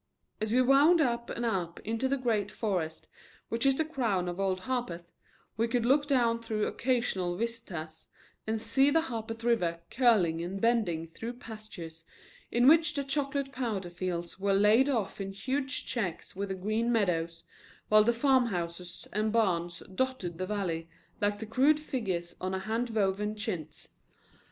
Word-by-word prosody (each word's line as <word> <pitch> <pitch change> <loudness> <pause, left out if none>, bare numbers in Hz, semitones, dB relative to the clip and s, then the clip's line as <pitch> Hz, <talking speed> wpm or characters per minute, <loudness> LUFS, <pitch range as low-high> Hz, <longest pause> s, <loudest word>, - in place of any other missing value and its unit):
As 215 0 -1
we 255 +2 +4
wound 285 +7 +6
up 235 -5 +1
and 240 - -3
up 180 -6 -1
into 230 +4 -1
the 275 +1 +1
great 220 -6 0
forest 180 -8 -3 0.4
which 230 +4 +1
is 270 -1 +3
the 315 - +1
crown 225 - 0
of 175 +1 -4
Old 190 -1 0
Harpeth, 185 -9 -3 0.5
we 230 +1 +2
could 235 0 0
look 285 +4 +3
down 235 -4 +2
through 220 -2 -1
occasional 225 -8 0
vistas 185 -9 -5 0.4
and 220 0 0
see 265 +6 +3
the 325 +3 +3
Harpeth 225 -5 -5
River 180 -8 +1
curling 205 -11 +3
and 185 +3 -4
bending 210 -8 +1
through 230 +8 -6
pastures 215 -9 -10 0.5
in 240 +2 +4
which 315 0 +6
the 280 - 0
chocolate 275 0 -1
plowed 215 -9 -3
fields 175 0 -4
were 195 0 +2
laid 215 +7 +5
off 220 -6 -1
in 195 0 -4
huge 260 +6 -2
checks 190 -9 -3
with 200 +1 -3
the 190 - -2
green 215 +5 0
meadows, 170 -7 0 0.5
while 215 0 +7
the 235 - +4
farmhouses 180 -10 0
and 215 +2 +1
barns 175 -6 0
dotted 185 -7 -2
the 185 - -2
valley 175 -5 -2 0.3
like 205 0 +1
the 220 - -6
crude 270 +7 +3
figures 185 - -3
on 185 +1 -1
a - - -2
hand 225 +5 -1
woven 210 -1 0
chintz. 180 -8 -5
220 Hz, 165 wpm, -30 LUFS, 185-245 Hz, 0.5 s, while